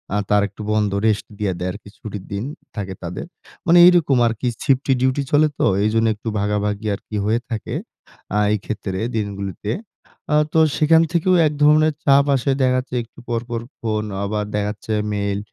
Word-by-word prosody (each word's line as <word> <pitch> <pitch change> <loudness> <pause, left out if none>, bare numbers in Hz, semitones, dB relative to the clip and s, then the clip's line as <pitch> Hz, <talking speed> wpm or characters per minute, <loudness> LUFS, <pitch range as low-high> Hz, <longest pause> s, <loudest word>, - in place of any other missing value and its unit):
আ - - +2
তার 105 0 +4
একটু 105 +1 -12
বন্ধ, 105 -2 +1 0.2
রেস্ট 105 -2 +1
দিয়া 100 -3 -1
দেয় 90 +1 -2
আরকি 100 +1 -11
ছুটির 105 -3 -7
দিন 100 +3 -2 0.3
থাকে 95 -3 -4
তাদের। 85 - -5 0.4
মানে 175 0 +5
এইরকম 170 -7 +5
আরকি 115 +2 -2 0.2
শিফটলি 135 0 +2
ডিউটি 130 +2 +2
চলে 150 +1 +5
তো - - +3 0.2
এইজন্য 115 +1 +2
একটু 110 - -11
ভাগাভাগি 105 +1 -1
আরকি 105 - -9
হয়ে 115 +2 +2
থাকে 110 - -4 0.6
আ - - +2 0.2
এই - - +2
ক্ষেত্রে 100 -3 -4 0.2
দিনগুলোতে। 100 0 -3 0.6
আ - - +5 0.2
তো 160 - +4 0.2
সেখান 160 +1 +5
থেকেও 180 +2 +2
এক 150 - -2
ধরনের 155 +1 +5
চাপ 140 0 +5
আসে। 135 +2 0
দেখাচ্ছে 130 0 0
একটু 115 - -18
পরপর 120 0 -2 0.2
ফোন, 110 -2 -1 0.2
আবার 105 +1 -2
দেখাচ্ছে 105 +1 -2 0.2
মেইল। 100 0 -1
110 Hz, 170 wpm, -21 LUFS, 105-135 Hz, 0.6 s, মানে